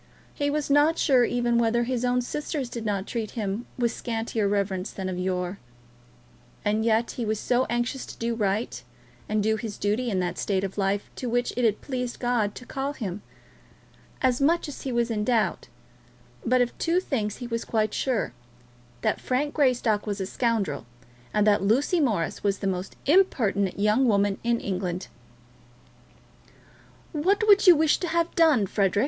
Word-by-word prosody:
He 285 0 -1
was 290 -1 -1
not 295 +3 +4
sure 255 -4 +4
even 240 -1 +1
whether 235 +1 +2
his 250 0 -2
own 250 0 +1
sisters 290 0 -3
did 230 -2 -6
not 200 -2 -1
treat 225 -3 -4
him 210 +2 -3
with 240 -2 +1
scantier 225 -2 -2
reverence 200 -1 -1
than 190 -1 -5
of 180 -1 -4
yore. 180 +1 -2 1.1
And 215 +1 +1
yet 230 +1 +2
he 245 - -4
was 215 -1 -1
so 250 +1 +1
anxious 240 +2 -2
to - - -10
do 235 0 -1
right, 210 0 -1 0.5
and 215 -1 +1
do 220 +1 +2
his 215 -2 -6
duty 215 +5 0
in 190 -4 0
that 180 -1 -2
state 195 -2 0
of 195 -1 -4
life 195 +1 -1
to 250 - -3
which 245 +1 0
it 245 0 +1
had 215 -2 +1
pleased 250 -3 -4
God 240 -4 0
to 250 - -9
call 270 +2 -3
him! 205 -7 -5 1.0
As 255 -1 +3
to - - +1
much 310 -1 +1
he 265 - -3
was 235 -1 0
in 210 -2 -1
doubt; 230 -1 0 0.8
but 250 +1 +3
of 245 - 0
two 340 +2 +2
things 220 - -2
he 245 - -6
was 230 -1 -3
quite 215 -2 0
sure, 255 - -1 0.7
that - - 0
Frank 285 +3 -1
Greystock 245 -7 +2
was 205 -1 -2
a 190 - -1
scoundrel, 200 - -1 0.4
and 210 -1 +2
that 205 -2 +4
Lucy 260 - +2
Morris 215 - 0
was 200 -1 +1
the - - -6
most 185 -1 -2
impertinent 230 - +2
young 210 +6 +3
woman 200 -2 +2
in 235 0 +1
England. 185 -1 -3 2.0
"What 390 +8 +1
would 405 -1 +6
you 355 - +10
wish 310 0 +3
to 355 - -2
have 335 +1 0
done, 310 -11 +4
Frederic?" 195 0 +1
230 Hz, 180 wpm, -26 LUFS, 205-255 Hz, 2.0 s, you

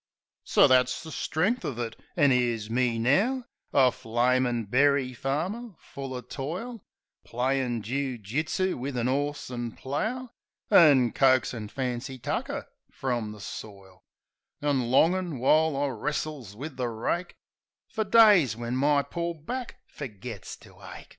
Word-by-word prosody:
So - - +5
that's 130 +2 +3
the 160 - -9
strength 195 +12 0
of 125 - -4
it. 115 -2 -4 0.2
An' 145 -4 +5
'ere's 120 -4 0
me 120 -1 +1
now 205 - +2 0.3
A 130 -2 +5
flamin' 120 +1 0
berry 135 +3 +2
farmer, 180 - -3
full 135 -1 -8
o' 125 - -4
toil; 170 - -6 0.4
Playin' 125 -2 -1
joo 130 +2 -2
jitsoo 150 - -1
wiv 135 +1 -4
an 120 0 0
'orse 145 +1 -2
an' 120 -2 -4
plough. 225 - -3 0.4
An' 140 - +6
coaxin' 130 -5 +2
fancy 130 +1 -4
tucker 120 - -3 0.2
f - - -27
rum 120 -5 -1
the 105 - -11
soil; 100 -2 -10 0.6
An' 135 -5 0
longin', 170 +4 +3
while 155 +4 +3
I 145 0 0
wrestles 140 -3 -4
with 135 +3 -7
the 125 -2 -1
rake, 120 +10 -3 0.5
Fer 220 - -2
days 200 - +6
when 120 +1 -3
my 140 +2 +3
poor 170 +1 -3
back 245 - -6
fergits 110 -9 -8
to - - -17
ache. - - -11
135 Hz, 140 wpm, -27 LUFS, 120-155 Hz, 0.6 s, An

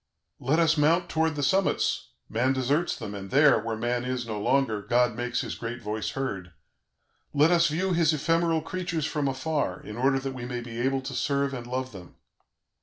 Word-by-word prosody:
"Let 140 +5 +1
us 165 -2 +3
mount 165 +4 +3
towards 160 0 +1
the 145 - -2
summits; 190 +8 +1 0.2
man 125 +4 +1
deserts 140 +6 0
them, 105 - -6
and 95 -1 -7
there, 145 -1 +5
where 115 +1 -3
man 120 +2 -1
is 125 -1 -2
no 110 -2 -4
longer, 125 -3 +1
God 120 +2 +2
makes 120 0 -1
His - - -4
great 120 +1 -5
voice 110 -1 -3
heard; 95 -10 -4 0.8
let 150 +4 +5
us 170 -1 +5
view 180 +5 0
His 165 -2 +3
ephemeral 165 +1 +1
creatures 170 -2 -3
from 150 -2 -1
afar, 135 - -1
in 105 +1 -9
order 135 +2 +3
that 135 0 -3
we 125 -2 -6
may 125 -1 -4
be 120 0 -6
able 135 +1 +1
to 135 +1 -6
serve 140 +2 0
and 120 -2 -6
love 130 +1 -3
them. 95 -4 -12
135 Hz, 195 wpm, -27 LUFS, 120-155 Hz, 0.8 s, there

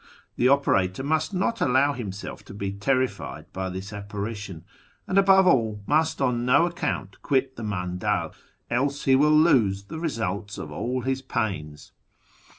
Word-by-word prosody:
The 125 - +3
operator 130 -6 +2
must 155 +4 0
not 200 +4 -1
allow 140 +2 +3
himself 105 -6 -6
to 100 - -11
be 100 -1 -3
terrified 130 +6 -2
by 95 0 -3
this 95 +3 -7
apparition, 100 -3 -6 0.4
and, 195 - +2
above 190 -1 +6
all, 110 - +2
must 160 +4 +1
on 125 -3 +1
no 125 +7 +4
account 150 - -3
quit 135 -1 0
the - - -8
mandal, 90 -3 -2 0.4
else 140 +4 0
he 135 - +4
will 145 +3 +4
lose 125 - +4
the 130 +11 -7
results 105 - -3
of - - -7
all 125 +2 -2
his 135 +1 -1
pains. 95 - -4
125 Hz, 155 wpm, -25 LUFS, 100-140 Hz, 0.4 s, above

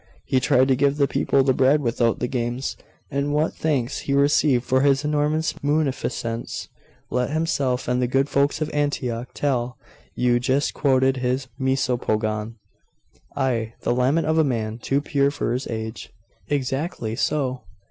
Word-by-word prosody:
He 130 - +2
tried 130 +1 +3
to 130 - +4
give 140 +2 +2
the 140 -1 +3
people 135 0 +2
the 130 0 +3
bread 135 +3 +4
without 120 -3 +1
the 125 - -2
games.... 120 +1 -2 0.4
And 140 +1 -1
what 155 +2 +1
thanks 140 -5 -1
he 140 - -2
received 140 -2 +3
for 130 0 +2
his 140 +1 +3
enormous 150 +1 +1
munificence, 130 -6 -2 0.4
let 125 0 0
himself 145 -5 0
and 125 +1 +1
the 125 - +2
good 135 +3 +1
folks 140 +2 +1
of 155 - -1
Antioch 130 -5 -1
tell 125 -4 -1 0.4
you 120 -1 +2
just 130 +3 0
quoted 135 -2 +2
his 130 +1 -1
Misopogon 115 -4 0 0.4
' - - -34
'Ay 115 -5 -1
the - - +1
lament 130 +6 +2
of 160 +1 +2
a - - +5
man 115 -5 -2
too 135 +4 0
pure 140 -1 +1
for 140 -4 -2
his 125 +2 -3
age.' 110 0 -5 0.4
'Exactly 135 -4 -2
so. 130 -1 -1
130 Hz, 160 wpm, -23 LUFS, 125-145 Hz, 0.4 s, a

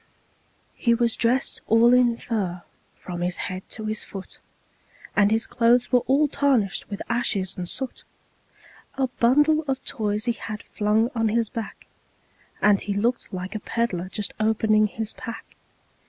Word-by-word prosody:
He 235 -1 +2
was 235 -1 +1
dressed 250 +3 +1
all 230 +2 +5
in 245 -2 +4
fur, 190 -8 -3 0.3
from 175 -1 -7
his 175 0 -1
head 185 0 -5
to 220 - -7
his 215 0 -1
foot, 195 -2 -9 0.8
And 205 0 +5
his 225 +1 +1
clothes 240 +1 +2
were 250 - +5
all 285 +3 +4
tarnished 265 -9 +1
with 200 - -5
ashes 205 -6 0
and 175 -1 -5
soot; 265 -1 -4 0.9
A 270 - +1
bundle 295 +6 +4
of 265 -1 -2
toys 210 0 -1
he 240 - +2
had 215 -2 -6
flung 215 +3 +1
on 225 -2 +1
his 225 0 +1
back, 225 -1 -7 0.8
And 205 -1 +5
he 200 - -3
looked 235 +4 -1
like 185 0 -5
a 215 - -3
peddler 195 -5 -2
just 205 +1 -1
opening 215 0 +3
his 220 +1 -5
pack. 230 - -9
225 Hz, 155 wpm, -24 LUFS, 205-240 Hz, 0.9 s, all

